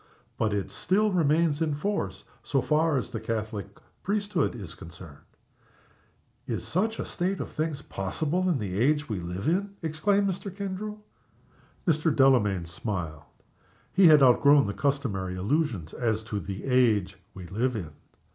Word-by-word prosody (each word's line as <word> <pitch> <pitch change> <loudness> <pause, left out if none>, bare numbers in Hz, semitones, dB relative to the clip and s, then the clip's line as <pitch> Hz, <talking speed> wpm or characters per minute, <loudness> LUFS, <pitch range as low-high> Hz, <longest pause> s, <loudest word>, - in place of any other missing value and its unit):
But 110 - 0
it 100 -1 -2
still 210 +3 +1
remains 160 -2 +2
in 155 -3 +1
force 200 +7 -2 0.2
so 140 - 0
far 150 +4 +2
as 125 - -3
the 115 - -3
Roman 110 - -16
Catholic 105 -3 -6 0.2
priesthood 205 - 0
is 95 -8 -8
concerned." 85 -3 -12 1.3
"Is - - -3
such 220 +6 0
a - - -3
state 185 +2 -2
of - - -5
things 155 -2 -3
possible 155 - -1
in 170 - +2
the 100 -4 -3
age 150 +4 +2
we 105 -5 -3
live 90 +7 -4
in!" 195 +4 0
exclaimed 200 +6 +1
Mr. 190 +1 -3
Kendrew. 200 +2 -5 0.9
Mr. 160 -1 +2
Delamayn 120 -11 +3
smiled. 85 -3 -4 0.7
He 190 -2 +7
had 150 -3 +7
outgrown 140 +2 +6
the 100 - -2
customary 100 -7 -1
illusions 105 - -1
as 110 -3 -1
to 105 -2 -3
the 95 +1 -6
age 110 -8 +2 0.2
we 95 -2 -8
live 115 +8 -1
in. 85 -8 -5
135 Hz, 155 wpm, -27 LUFS, 100-165 Hz, 1.3 s, He